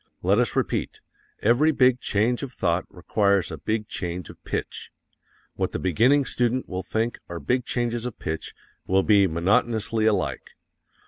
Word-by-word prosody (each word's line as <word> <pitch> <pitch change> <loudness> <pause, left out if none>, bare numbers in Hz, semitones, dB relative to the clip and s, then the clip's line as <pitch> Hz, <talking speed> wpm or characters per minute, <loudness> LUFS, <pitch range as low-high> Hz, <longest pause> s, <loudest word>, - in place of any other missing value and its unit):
Let 100 +5 +3
us 125 - +1
repeat, - - -1 0.4
every 125 +8 +4
big 130 -3 +3
change 115 +4 0
of 140 -3 -5
thought 85 -6 0
requires 100 0 +1
a 80 - -5
big 110 +7 -2
change 90 -4 -4
of - - -20
pitch. - - -4 0.6
What - - -2
the - - -1
beginning 125 - +3
student 125 +1 0
will 95 0 -4
think 110 +5 -2
are 85 -1 -5
big 125 +5 0
changes 120 -1 -1
of 125 - -8
pitch 80 0 -5 0.3
will 95 +1 +3
be 100 -2 +5
monotonously 105 +6 +1
alike. 105 -4 -1
110 Hz, 155 wpm, -25 LUFS, 95-120 Hz, 0.6 s, be